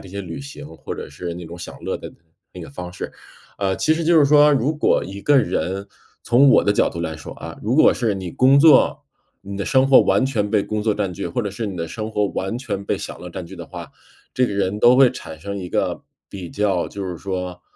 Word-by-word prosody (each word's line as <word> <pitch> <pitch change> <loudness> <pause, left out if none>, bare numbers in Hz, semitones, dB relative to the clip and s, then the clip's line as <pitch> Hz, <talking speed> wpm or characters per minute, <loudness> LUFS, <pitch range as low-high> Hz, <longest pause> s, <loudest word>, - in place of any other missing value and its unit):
这 95 - -12
些 100 +2 -6
旅 85 +1 -7
行， 140 - -9
或 - - -7
者 - - -7
是 85 -1 -6
那 90 0 -8
种 85 +2 -9
享 85 - -9
乐 - - -2
的 - - -10 0.4
那 - - -9
个 - - -9
方 90 +4 -8
式。 - - -7 0.5
呃， 95 -2 0
其 155 - +2
实 165 - -2
就 165 0 +5
是 145 - +6
说， 150 +1 +6
如 140 +3 +1
果 150 - +2
一 100 +1 -8
个 145 -1 +5
人， 100 -5 -2 0.4
从 130 +4 +5
我 - - +5
的 100 - +3
角 - - +2
度 85 - -6
来 80 -1 -4
说 80 - -9
啊， - - -9
如 115 +5 0
果 155 - +6
是 115 -4 0
你 90 -3 -6
工 135 +2 +5
作 155 -3 +5 0.4
你 100 0 -7
的 100 - -3
生 130 0 +3
活 135 - +8
完 - - +2
全 105 -6 -1
被 105 -1 +3
工 110 -1 -3
作 110 -1 +2
占 100 -3 -2
据， - - -5
或 85 - -2
者 100 - -2
是 105 +3 -4
你 95 - -6
的 85 -1 -3
生 110 +4 -5
活 105 -1 +1
完 95 +5 -3
全 100 -7 -4
被 - - -1
享 - - -7
乐 90 - -8
占 95 +1 -6
据 95 - -11
的 - - -8
话， - - -9 0.5
这 130 - +3
个 - - -4
人 100 +1 -1
都 120 +1 +6
会 135 -1 +7
产 80 - -9
生 100 +4 -5
一 90 -2 -6
个， - - -1 0.3
比 90 -4 -8
较， 100 -4 0
就 100 -1 -6
是 90 -2 -5
说， 90 -2 -5
100 Hz, 275 characters per minute, -21 LUFS, 90-130 Hz, 0.5 s, 活